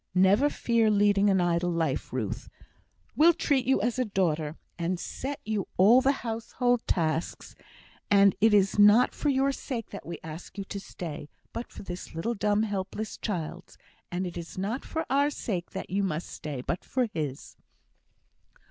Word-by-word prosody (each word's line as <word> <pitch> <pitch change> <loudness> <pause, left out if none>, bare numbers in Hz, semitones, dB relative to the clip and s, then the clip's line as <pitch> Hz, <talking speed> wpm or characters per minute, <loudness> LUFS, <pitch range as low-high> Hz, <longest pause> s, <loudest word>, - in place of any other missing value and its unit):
Never 200 +10 +5
fear 230 -5 +2
leading 205 -1 +4
an 190 -1 +3
idle 175 0 +1
life, 165 -5 -1
Ruth. 115 -6 -3 0.7
We'll 335 +3 +6
treat 285 -6 +1
you 265 -5 +3
as 240 +2 0
a - - +3
daughter, 165 -7 0 0.2
and 170 +1 -2
set 275 +8 -5
you 215 -3 -2
all 220 +7 +7
the 270 - +4
household 235 +2 0
tasks; 160 -2 -1 0.6
and 200 -1 +5
it 225 +1 +6
is 200 0 +3
not 210 +5 +6
for 295 - -1
your 275 0 +2
sake 250 -4 -5
that 200 - -7
we 170 0 -6
ask 160 +5 -9
you 200 - -3
to 200 +1 -6
stay, 155 -6 -7 0.2
but 235 - -6
for - - -10
this 180 -3 -7
little 195 +9 -1
dumb 210 0 +1
helpless 205 +1 -3
child's; 180 -3 -5 0.3
and 180 +1 -2
it 175 - -6
is 170 +1 -8
not 210 +8 -2
for 320 0 -3
our 285 +2 +3
sake 190 -11 -4
that - - -7
you 200 +2 +1
must 175 -4 -2
stay, 145 -4 -6
but 170 +7 -3
for 255 -1 0
his." 145 -4 -4
200 Hz, 175 wpm, -28 LUFS, 170-235 Hz, 0.7 s, all